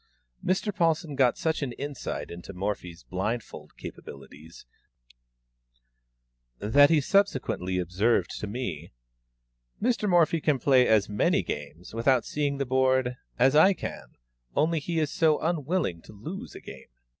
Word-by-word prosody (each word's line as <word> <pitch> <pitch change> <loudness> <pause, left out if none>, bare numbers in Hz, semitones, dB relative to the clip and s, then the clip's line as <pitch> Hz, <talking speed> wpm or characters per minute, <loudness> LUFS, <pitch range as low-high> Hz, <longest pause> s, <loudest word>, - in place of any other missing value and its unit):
Mr. 190 +2 0
Paulsen 165 -4 +1
got 130 -3 +3
such 160 -1 -1
an 130 -4 -3
insight 145 +1 -5
into 90 +3 -9
Morphy's 90 -3 -4
blindfold 105 +6 -5
capabilities, 80 +1 -11 1.9
that 145 - +5
he 165 -2 +4
subsequently 130 - +1
observed 90 +6 +1
to 105 - -5
me, 95 - -5 0.9
"Mr. 225 -2 +1
Morphy 170 -2 +3
can 150 -2 +2
play 130 -1 +4
as 110 -3 +3
many 105 0 +1
games, 75 +6 -7
without 120 +2 +2
seeing 145 -1 -1
the 140 - -1
board, 130 -1 +2 0.2
as 130 +3 +4
I 185 +6 +7
can, - - -8 0.4
only 165 +1 +2
he 165 +3 -3
is 155 -2 0
so 155 -2 +3
unwilling 160 - -1
to - - -14
lose 155 - -8
a - - -9
game." - - -11
130 Hz, 135 wpm, -27 LUFS, 105-160 Hz, 1.9 s, I